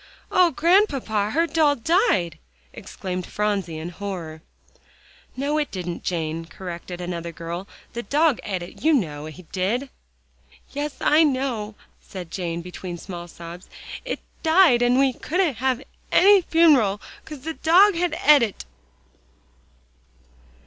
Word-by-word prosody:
"Oh, 365 -1 +5
Grandpapa, 285 - +2
her 330 +9 +2
doll 310 -3 +2
died!" 230 - +1 0.3
exclaimed 180 -1 -6
Phronsie 200 -6 -2
in 160 +2 -5
horror. 175 -4 -6 1.0
"No, 290 +3 0
it 295 - -1
didn't, 180 -2 -5
Jane," 165 -1 -2
corrected 175 +1 -8
another 170 -1 -4
girl, 170 +3 -6 0.3
"the 235 - -3
dog 290 +4 +2
et 190 -4 -4
it; 175 - -12
you 320 +1 +4
know 155 - -1
he 155 +4 -11
did." 230 +9 -1 0.8
"Yes, 290 0 -4
I 310 +2 +5
know," 255 -7 -1 0.2
said 180 -3 -9
Jane, 170 -2 -3
between 180 0 -7
small 175 -1 -8
sobs, 170 +1 -11 0.3
"it - - -4 0.2
died, 320 -7 +5
and 245 +1 +3
we 270 -1 +3
couldn't 325 -2 -1
have 260 +1 0 0.3
any 395 +1 +6
fun'ral, 290 - +4 0.2
'cause 300 -4 -9
the 320 +4 -4
dog 370 +7 +5
had 350 +1 -1
et 295 -1 +8
it." 220 -4 -2
220 Hz, 135 wpm, -23 LUFS, -, 1.0 s, et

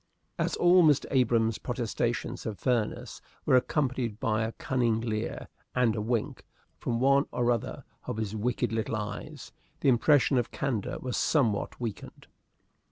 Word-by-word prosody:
As - - 0
all 180 +1 +5
Mr. 150 -3 +4
Abrahams' 115 -4 +2
protestations 120 0 -2
of 105 -3 -4
fairness 120 -5 -1 0.2
were - - +4
accompanied 125 -4 0
by 110 -4 0
a 110 +1 -1
cunning 120 -4 0
leer 110 -2 -3 0.3
and 120 -4 +3
a 105 - -2
wink 115 0 -2 0.4
from 115 -1 -1
one 140 +2 +4
or 120 -1 +1
other 115 -2 -3 0.2
of - - -3
his 110 -1 -3
wicked 120 +1 -1
little 110 0 -1
eyes, 105 -1 -6 0.3
the - - +4
impression 135 +1 +4
of 120 - -2
candor 125 -7 -2
was 125 -1 -4
somewhat 115 -10 +1
weakened. 115 -4 -6
120 Hz, 150 wpm, -29 LUFS, 110-130 Hz, 0.4 s, all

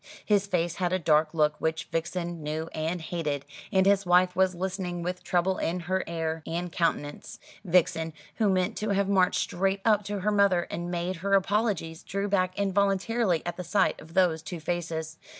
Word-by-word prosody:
His 205 -2 +2
face 175 -2 -1
had 180 -2 0
a 185 - +2
dark 155 -2 +3
look 150 -2 +2
which 160 0 0
Vixen 170 0 -3
knew 155 +2 -3
and 160 +3 -2
hated, 150 -5 -3 0.3
and 190 0 +3
his 200 0 +4
wife 180 0 +4
was 190 -1 +2
listening 180 -1 -3
with 180 +1 -4
trouble 185 +1 +1
in 175 +2 -1
her 185 +2 -1
air 165 -1 -2
and 175 +1 -3
countenance. 165 -4 -2 0.3
Vixen, 170 -3 +2 0.3
who 215 -3 +3
meant 185 -1 +1
to 215 - -2
have 200 -1 +1
marched 190 -2 +3
straight 195 +2 0
up 210 -2 +4
to 205 -1 -3
her 210 +3 +1
mother 200 -4 +3
and 175 +1 -4
made 175 +1 -2
her 195 +3 +1
apologies, 195 -5 0
drew 200 +1 -3
back 185 -2 0
involuntarily 200 -1 +1
at 175 - -4
the 180 - -4
sight 190 +2 +1
of 160 +1 -14
those 175 -4 +3
two 170 +1 -6
faces. 160 -1 -3
180 Hz, 185 wpm, -28 LUFS, 165-195 Hz, 0.3 s, his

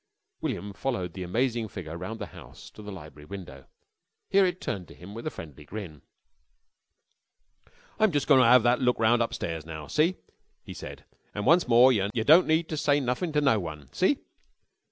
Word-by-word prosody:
William 100 0 -4
followed 95 -9 -3
the 95 - -7
amazing 115 +5 -1
figure 85 -5 -8
round 110 +6 -6
the - - -4
house - - -13
again - - -30
to - - -11
the 105 0 -8
library 75 -5 -11
window. 80 -8 -9 0.7
Here 195 -1 +5
it 180 0 -3
turned 90 -4 -4
to - - -14
him 90 +4 -11
with 115 +6 -6
a - - +1
friendly 75 - -11
grin. 80 -3 -8 2.0
"I'm 215 -2 +4
just 145 -3 0
goin' 130 - +6
to - - +5
'ave 125 -1 +7
that 120 +2 +3
look 125 -1 +2
round 115 +2 +3
upstairs 80 -8 -3
now. 80 -1 -8
See?" 165 - +1 0.5
he - - -9
said. - - -9 0.3
"An' 105 - -3
once 170 +2 +4
more, 125 +2 +6
yer 100 -3 0
don't 160 +8 +6
need 160 +1 +2
ter 155 - -4
say 145 -1 +2
nothin' 135 +6 -2
to 150 - +2
no 135 -7 +3
one. 75 -6 -8
See?" 260 +10 +2
115 Hz, 195 wpm, -27 LUFS, 90-145 Hz, 2.0 s, ave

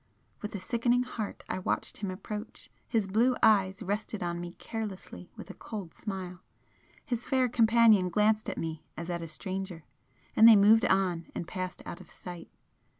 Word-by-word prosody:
With 210 0 -5
a - - -3
sickening 240 +5 +1
heart 225 -4 -6
I - - -2
watched 185 - -2
him 200 -1 -4
approach, 210 +3 -7 0.2
his 225 -4 +1
blue 230 +6 +2
eyes 195 -1 +4
rested 205 +1 -3
on 175 0 -2
me 175 0 -7
carelessly 205 -5 -7
with - - -9
a - - -10
cold 200 -7 -7
smile 185 -3 -6 0.6
his 240 -1 -3
fair 260 -1 +3
companion 225 -5 +5
glanced 210 +4 +2
at - - -5
me 160 -1 -4
as 170 +1 -4
at 170 -1 -3
a 165 - -5
stranger 185 +1 -5 0.5
and 225 - +8
they 225 - +10
moved 210 +3 +6
on 180 -3 +1
and 170 - -4
passed 185 0 -5
out - - -7
of - - -15
sight. 175 -2 -9
200 Hz, 175 wpm, -30 LUFS, 180-220 Hz, 0.6 s, they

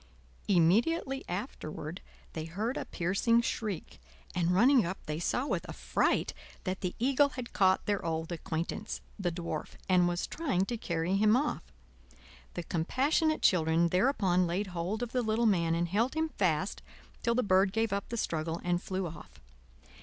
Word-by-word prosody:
Immediately 235 - +2
afterward 175 - -5 0.3
they 160 -1 -4
heard 210 +10 -2
a - - -3
piercing 195 +7 +2
shriek, 210 - -4 0.3
and 175 -1 +1
running 240 +8 +5
up 185 +2 -3
they 150 +1 -3
saw 245 +9 0
with - - -1
affright - - 0 0.3
that 185 0 -3
the 180 -1 -2
eagle 275 +4 +3
had 250 -3 -7
caught 190 -1 +3
their 205 -1 0
old 160 0 -2
acquaintance. 170 +4 -4 0.2
the 180 -3 0
Dwarf, 165 -2 -5
and 180 -2 +4
was 175 0 -1
trying 235 - -1
to 240 - -3
carry 170 +1 0
him 215 +2 +5
off. 295 +3 -2 0.8
The 175 - -3
compassionate 275 - +1
children 165 -1 +4
thereupon 185 -3 +2
laid 180 +5 -1
hold 180 +7 -2
of 240 - -4
the 255 - +1
little 220 +1 +1
man, 170 -6 +3
and 170 +1 0
held 225 - 0
him 320 0 0
fast 185 - 0 0.4
till 235 -1 +1
the 250 - +2
bird 190 0 +4
gave 225 0 0
up 200 0 -3
the 235 - -3
struggle 165 -4 -2
and 175 0 0
flew 190 0 -3
off. 155 - -10
190 Hz, 165 wpm, -31 LUFS, 170-235 Hz, 0.8 s, running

